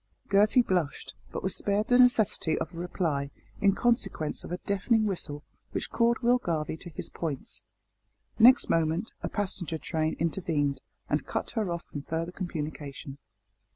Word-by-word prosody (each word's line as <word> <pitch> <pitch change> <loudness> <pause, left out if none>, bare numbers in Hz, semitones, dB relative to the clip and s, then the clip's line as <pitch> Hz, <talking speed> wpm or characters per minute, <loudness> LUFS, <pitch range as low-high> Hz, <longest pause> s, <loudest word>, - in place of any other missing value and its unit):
Gertie 210 +5 +5
blushed, 175 -9 -1 0.2
but - - -5
was 190 - +1
spared 205 +2 0
the 245 0 +5
necessity 220 -9 +4
of 165 +2 -4
a 165 - -7
reply 160 -5 -1 0.3
in 200 -1 +4
consequence 215 - 0
of - - -8
a 180 - -1
deafening 215 +4 +1
whistle 150 -7 -2 0.3
which - - -3
called 235 0 +3
Will 245 +1 +4
Garvie 160 -8 -2
to 175 - -9
his 155 - -4
points. 150 -6 -4 0.8
Next 250 +4 +8
moment, 165 +5 +1
a - - -3
passenger 185 -5 -2
train 160 -1 -1
intervened, 150 -5 0 0.3
and - - -1
cut - - -2
her 215 -6 -1
off 170 0 -3
from 145 - -7
further 165 +4 -3
communication. 150 -6 -6
175 Hz, 155 wpm, -29 LUFS, 155-205 Hz, 0.8 s, Next